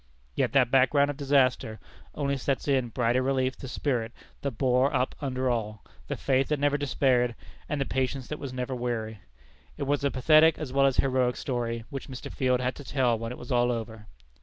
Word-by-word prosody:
Yet - - 0
that 130 -3 +4
background 140 +2 +4
of 140 - -10
disaster 130 -6 +1 0.4
only 140 -1 0
sets 135 +1 -2
in 130 -4 +1
brighter 120 +2 +1
relief 130 0 0
the 135 - -9
spirit 125 -4 -2 0.3
that 140 - -1
bore 130 +2 +3
up 125 - 0
under 130 -2 -1
all, 110 -4 -2 0.2
the - - -2
faith 135 -1 +1
that 150 - 0
never 145 0 +2
despaired, 130 -4 +1 0.3
and 150 - -1
the 135 - 0
patience 130 0 -2
that 150 - -4
was 140 - -6
never 125 +1 -3
weary. 115 -3 -3 0.6
It - - -3
was 140 +1 0
a 140 - +3
pathetic 155 +4 +5
as 145 -5 -6
well 135 0 +4
as 135 - 0
heroic 130 -2 +2
story 115 -3 -3
which 140 +1 -6
Mr. 130 -1 -7
Field 125 -1 +1
had 125 0 0
to 145 - -9
tell 125 -3 +1
when 115 +1 -4
it 125 - -7
was 125 - -9
all 120 0 +3
over. 110 -2 -6
130 Hz, 205 wpm, -27 LUFS, 120-140 Hz, 0.6 s, pathetic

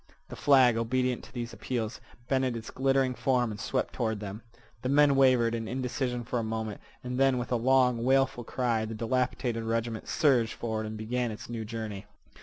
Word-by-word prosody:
The - - -7
flag, 130 -5 +5
obedient 125 +1 0
to - - -15
these 120 -1 -5
appeals, 115 0 -3 0.3
bended 130 -3 +1
its 115 - -8
glittering 135 -1 +2
form 125 -3 +1
and 105 - -7
swept 130 +3 -2
toward 110 -4 -1
them. 105 +1 -6 0.4
The 130 - -2
men 145 0 +5
wavered 130 -4 +4
in 115 -1 -3
indecision 125 0 -2
for 120 +1 -2
a - - -2
moment, 110 -1 -4 0.2
and 125 +1 -3
then 135 -1 +4
with 120 0 -4
a - - +3
long, 125 -1 +3
wailful 135 -1 +2
cry 120 -3 0
the 110 0 -5
dilapidated 120 0 -1
regiment 115 0 -2
surged 135 -8 +2
forward 110 -2 -3
and 110 0 -6
began 120 +3 -1
its 110 +2 -8
new 115 -2 -4
journey. 105 -2 -6
120 Hz, 190 wpm, -29 LUFS, 115-130 Hz, 0.4 s, flag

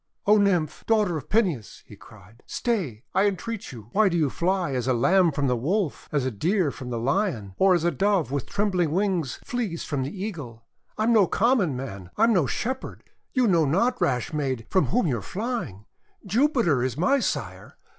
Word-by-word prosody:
(O 210 +1 +5
Nymph! 180 -7 +1
daughter 210 -6 +2
of 150 - -6
Peneus," 180 - 0
he - - -13
cried, 105 +5 -17
"stay, 170 - -2
I 195 +2 +3
entreat 215 +2 -4
you! 115 -4 -11
Why 210 -1 +4
do 175 - 0
you 150 -5 +1
fly 180 -2 0
as 125 -1 -2
a 130 - +2
Lamb 170 +8 +4
from 145 -1 -1
the 125 -2 +2
Wolf, 165 - -2
as 145 -4 0
a 130 - -1
Deer 170 - 0
from 130 -2 -8
the 120 - -3
Lion, 125 - -1
or 190 -1 +5
as 170 - 0
a 175 - +2
Dove 185 - +1
with 140 -3 -2
trembling 195 -5 0
wings 180 -7 0
flees 225 -9 -3
from 145 -3 -2
the 160 +9 -4
Eagle! 125 - -8 0.3
I 215 - 0
am 235 +2 +3
no 205 -5 +5
common 205 - +2
man! 100 -9 -7
I 220 - +3
am 230 0 +5
no 170 -9 +2
Shepherd! 255 - -4 0.3
You 255 -2 +3
know 170 -7 +3
not, 235 - +1
rash 125 +2 0
maid, 130 -6 -2
from 185 - +3
whom 245 +1 +1
you 125 -8 0
are - - -9
flying! 205 - -4 0.4
Jupiter 225 - +2
is 130 0 -2
my 275 - +3
sire. - - -4
175 Hz, 205 wpm, -25 LUFS, 130-210 Hz, 0.4 s, O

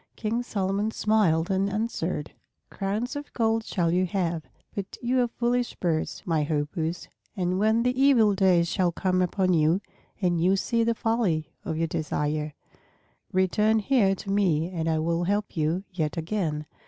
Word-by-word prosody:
King 230 +2 -1
Solomon 200 -2 -1
smiled 200 -7 +2
and 195 +1 +1
answered, 195 -7 -2 0.4
"Crowns 210 +7 -2
of 290 0 -6
gold 225 -1 +1
shall 175 -6 0
you 185 +1 +2
have. 170 -3 -1 0.3
But 195 -1 -5
you 250 +1 +1
are 245 - +2
foolish 240 +1 -1
birds, 165 -3 -2
my 165 -3 +1
Hoopoes; 160 +3 -2 0.3
and 180 0 0
when 220 +2 +3
the 250 0 +2
evil 240 -7 +5
days 185 -3 +3
shall 175 0 +1
come 185 +1 0
upon 185 +1 +1
you 160 +2 +3 0.4
and 175 -4 +1
you 185 +3 +4
see 230 +4 +1
the 230 0 +1
folly 195 -10 0
of 160 - -3
your 165 - +1
desire, 150 -1 -2 0.8
return 210 +4 +2
here 215 -3 +3
to 195 +1 -6
me 180 -4 +1
and 165 -2 -2
I 160 - +1
will 165 +2 0
help 205 +2 -1
you 160 +4 0
yet 160 -2 -2
again." 160 -3 -2
185 Hz, 165 wpm, -26 LUFS, 165-215 Hz, 0.8 s, evil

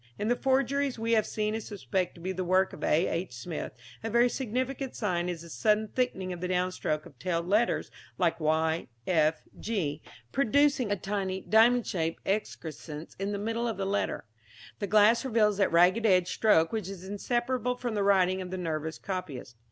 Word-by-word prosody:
In 210 - -1
the 245 - +3
forgeries 270 +1 +1
we 225 +1 -2
have 220 -2 +3
seen 215 0 -1
and 225 - -2
suspect 190 -3 -3
to 170 - -13
be 185 +2 -2
the 185 0 -3
work 185 +1 +2
of - - -9
A. 165 +4 +3
H. 170 -4 -3
Smith, 150 +7 -5 0.3
a 225 - -2
very 235 +2 +4
significant 260 +2 -3
sign 180 -5 -1
is 170 -2 -5
a 170 - -11
sudden 210 - +1
thickening 195 -8 -1
of 175 - -8
the 180 - -1
downstrokes 180 -4 -1
of 135 - -15
tailed 170 0 -1
letters 215 +5 +1 0.3
like 170 -2 +1
y, 160 +1 +1 0.2
f, 160 -3 +2 0.2
g, 190 -10 -2 0.3
producing 275 -2 +2
a - - +3
tiny 190 -1 -2
diamond 230 +4 +4
shaped 165 -2 -2
excrescence 160 -6 -4
in 195 +1 -2
the 205 - -2
middle 225 +3 -2
of 225 - -3
the 195 - -2
letter. 200 - -1 0.5
The 205 - -2
glass 215 +4 +5
reveals 215 -5 +2
that 195 - +2
ragged 180 +7 +4
edged 180 -2 +4
stroke 165 -8 +3
which 215 -4 -3
is 190 -2 -8
inseparable 240 +4 -1
from 245 -2 -4
the 205 - 0
writing 190 -2 +3
of 180 - -6
the 185 - -4
nervous 160 -2 -3
copyist. 180 - -6
195 Hz, 190 wpm, -29 LUFS, 175-225 Hz, 0.5 s, glass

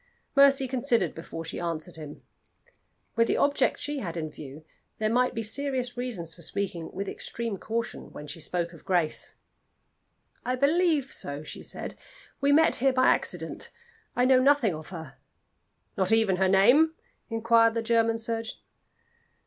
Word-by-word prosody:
Mercy 275 -1 +6
considered 245 - +1
before 165 0 -7
she 165 - -5
answered 170 0 -4
him. 150 -2 -10 0.9
With 230 0 +3
the - - +1
object 280 -2 +2
she 290 -1 -3
had 175 -7 -5
in 155 -2 -3
view, 150 +1 -10 0.3
there 215 0 0
might 250 +2 +2
be 225 - -2
serious 255 +1 -2
reasons 220 -10 -4
for 170 - -15
speaking 180 -1 -4
with 195 +1 -4
extreme 230 -2 -4
caution 230 +1 -4
when 150 - -9
she 150 +3 -7
spoke 170 +2 -3
of 165 - -14
Grace. 175 -5 -1 1.1
"I 250 - 0
believe 295 0 +2
so," 145 +1 -1
she - - -8
said. - - -6 0.5
"We 280 +1 +3
met 320 +3 +5
here 270 +1 +3
by 255 0 +4
accident. - - -1 0.5
I 245 - +3
know 260 0 +6
nothing 270 -7 +4
of 155 0 -8
her." 160 -7 -9 0.8
"Not 190 0 0
even 220 -4 +3
her 190 0 +3
name?" 260 +12 +5 0.3
inquired 230 0 +3
the 230 - -1
German 230 0 +2
surgeon. 225 0 -2
225 Hz, 155 wpm, -27 LUFS, 170-255 Hz, 1.1 s, Mercy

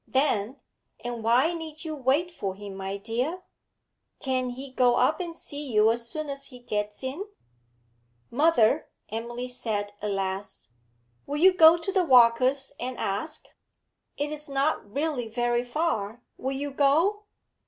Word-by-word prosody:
Then, 260 -2 0 0.4
'And 240 -2 -4
why 250 +9 +4
need 320 -1 -7
you 315 - -3
wait 285 +6 +1
for 195 - -4
him, 200 0 -8
my 195 +1 -4
dear? 250 - -3 0.8
Can't 255 -2 -1
he 265 +2 -8
go 250 -2 +3
up 295 +5 +2
and 340 -2 -4
see 285 -4 -7
you 215 0 +5
as 235 0 -3
soon 310 +2 -4
as 275 0 -3
he 255 - -11
gets 210 -2 -4
in?' 280 +10 -4 1.1
'Mother,' 285 -1 +3 0.2
Emily 240 +3 -4
said 210 -5 -3
at 210 - -2
last, 195 - -4 0.6
'will 290 - -2
you 370 +4 +6
go 330 -1 +8
to 340 +4 -3
the 380 -2 +3
Walkers' 255 0 +5
and 250 0 -4
ask? 210 +11 -3 0.7
It 290 +1 -2
is 300 -1 -5
not 275 -6 0
really 280 -2 -1
very 240 +1 0
far. 245 -5 -2
Will 265 +1 -3
you 285 +1 -3
go?' 325 +10 +2
260 Hz, 155 wpm, -27 LUFS, 230-300 Hz, 1.1 s, go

